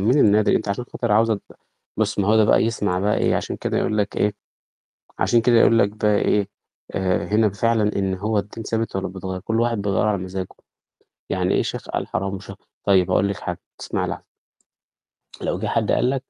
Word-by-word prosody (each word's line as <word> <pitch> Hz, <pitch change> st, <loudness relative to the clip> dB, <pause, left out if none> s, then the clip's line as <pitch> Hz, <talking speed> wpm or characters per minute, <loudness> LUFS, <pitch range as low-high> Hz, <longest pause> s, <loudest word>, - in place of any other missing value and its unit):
من 120 Hz, +9 st, +3 dB
الناد 105 Hz, -4 st, +4 dB
أنتِ 110 Hz, -, +1 dB
عشان 100 Hz, +5 st, -2 dB
خاطر 120 Hz, -3 st, -2 dB
عاوزة 110 Hz, +1 st, +4 dB
د 100 Hz, -, -7 dB, 0.6 s
مش 105 Hz, -1 st, 0 dB
معقولة 105 Hz, +2 st, +4 dB
بقى -, -, +4 dB
يسمع 105 Hz, -5 st, 0 dB
بقي 105 Hz, +2 st, +1 dB
إيه، -, -, +2 dB
عشان -, -, -3 dB
كده -, -, -2 dB
يقول 105 Hz, -, 0 dB
لك 105 Hz, 0 st, -1 dB
إيه 105 Hz, 0 st, +1 dB, 0.9 s
عشان 120 Hz, -1 st, +3 dB
كده 120 Hz, -1 st, +5 dB
أقول 115 Hz, -, +5 dB
لك 100 Hz, -3 st, +4 dB
بقى 105 Hz, 0 st, +1 dB
إيه، 105 Hz, -1 st, +1 dB, 0.4 s
آآ، 90 Hz, -3 st, 0 dB
هنا 105 Hz, +4 st, +3 dB
ب 100 Hz, -, -3 dB
فعلًا 110 Hz, 0 st, +1 dB
إن 95 Hz, -1 st, 0 dB
هو 105 Hz, +3 st, -1 dB
الدين 110 Hz, +2 st, -7 dB
ثابت 115 Hz, -2 st, -2 dB
والّا 95 Hz, -, -1 dB
بيتغيّر 95 Hz, 0 st, -5 dB
كل 115 Hz, +3 st, -1 dB
واحد 115 Hz, -1 st, +1 dB
بيغيّره 100 Hz, +1 st, +1 dB
على 100 Hz, -, +1 dB
مزاجه، 95 Hz, 0 st, -5 dB, 0.8 s
يعني -, -, +1 dB
إيه -, -, +3 dB
شيخ -, -, -5 dB
قال -, -, -2 dB
حرام 100 Hz, 0 st, -2 dB
وشخ 95 Hz, 0 st, -8 dB, 0.3 s
طيب 95 Hz, -3 st, +3 dB
هاقول 100 Hz, -, +3 dB
لِك 100 Hz, -, -3 dB
حاجة 90 Hz, -1 st, -5 dB, 0.2 s
تسمعي -, -, -2 dB
لحظة. -, -, -5 dB, 1.2 s
لو -, -, -2 dB
جِه -, -, -2 dB
حد -, -, 0 dB
قال 125 Hz, -, +2 dB
لك 135 Hz, 0 st, 0 dB
105 Hz, 205 wpm, -22 LUFS, 95-110 Hz, 1.2 s, كده